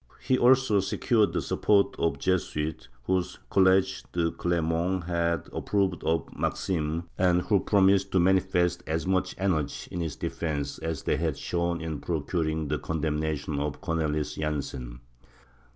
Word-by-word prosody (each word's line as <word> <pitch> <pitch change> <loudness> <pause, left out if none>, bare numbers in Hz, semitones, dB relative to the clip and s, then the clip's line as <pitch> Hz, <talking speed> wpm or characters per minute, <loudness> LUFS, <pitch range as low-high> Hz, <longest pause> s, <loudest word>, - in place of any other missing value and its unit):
He 130 +1 +1
also 125 -4 +4
secured 105 +3 +2
the - - -1
support 100 -1 +2
of 85 - +2
the - - -12
Jesuits, 80 -6 -1 0.2
whose 90 +3 -1
College 95 0 +3
de 85 -1 +1
Clermont 85 +1 0
had 85 -1 -1
approved 95 -4 0
of 80 0 +1
the - - -15
Maximes, 80 -2 -1 0.2
and 90 -1 +3
who 100 -3 +3
promised 100 0 +3
to 95 - +4
manifest 95 -1 +2
as 80 +1 -1
much 95 0 0
energy 85 -7 -1
in 90 - -4
his 80 -4 -3
defence 75 -4 -3
as 80 -3 -4
they - - +1
had - - -1
shown 85 -1 -1
in 80 -3 -4
procuring 80 -1 -1
the 75 +1 -1
condemnation 75 -1 -2
of 75 -1 -3
Cornelis 80 -4 -1
Jansen. 70 -5 -4
85 Hz, 150 wpm, -27 LUFS, 80-95 Hz, 0.2 s, also